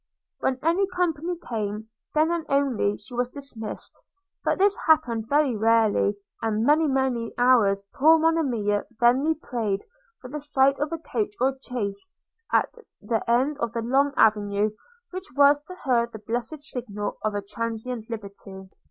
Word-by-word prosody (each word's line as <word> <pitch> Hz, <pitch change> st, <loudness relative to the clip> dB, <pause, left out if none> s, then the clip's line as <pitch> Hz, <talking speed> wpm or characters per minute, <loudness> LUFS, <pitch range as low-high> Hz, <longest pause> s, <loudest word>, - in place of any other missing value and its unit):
– -, -, -63 dB
When 260 Hz, -, 0 dB
any 345 Hz, +5 st, +2 dB
company 355 Hz, -2 st, -1 dB
came, 215 Hz, -1 st, -3 dB, 0.3 s
then 310 Hz, +2 st, +3 dB
and 335 Hz, -2 st, -2 dB
then 275 Hz, -, +3 dB
only 245 Hz, -7 st, 0 dB
she 210 Hz, -, -11 dB
was 245 Hz, 0 st, -1 dB
dismissed; 250 Hz, -6 st, -7 dB, 0.4 s
but -, -, +1 dB
this 400 Hz, +1 st, +4 dB
happened 235 Hz, -8 st, +2 dB
very 285 Hz, -4 st, +3 dB
rarely; 220 Hz, -2 st, +3 dB, 0.3 s
and 220 Hz, 0 st, 0 dB
many 305 Hz, +3 st, +4 dB
many 265 Hz, -4 st, -1 dB
hours 230 Hz, -6 st, +4 dB
poor 320 Hz, +4 st, +6 dB
Monimia 260 Hz, -11 st, +1 dB
vainly 260 Hz, +7 st, +4 dB
prayed 225 Hz, -9 st, -3 dB, 0.3 s
for 250 Hz, -, -10 dB
the 300 Hz, -, -4 dB
sight 275 Hz, -1 st, +2 dB
of 295 Hz, +2 st, -1 dB
a 330 Hz, -, -2 dB
coach 410 Hz, +5 st, -3 dB
or 265 Hz, +1 st, +2 dB
chaise 220 Hz, -, -4 dB, 0.4 s
at -, -, +2 dB, 0.3 s
the 225 Hz, -2 st, -1 dB
end 265 Hz, +5 st, +2 dB
of 235 Hz, -1 st, -2 dB
the 230 Hz, -1 st, -2 dB
long 270 Hz, +4 st, +2 dB
avenue, 210 Hz, -1 st, +3 dB, 0.4 s
which 375 Hz, +1 st, -7 dB
was 285 Hz, 0 st, +6 dB
to 365 Hz, -, -9 dB
her 240 Hz, -4 st, +2 dB
the 230 Hz, -, -10 dB
blessed 235 Hz, +8 st, -4 dB
signal 240 Hz, -8 st, -5 dB
of 215 Hz, -1 st, -1 dB
transient 230 Hz, +2 st, -4 dB
liberty. 200 Hz, -3 st, -9 dB
245 Hz, 160 wpm, -25 LUFS, 220-295 Hz, 0.4 s, poor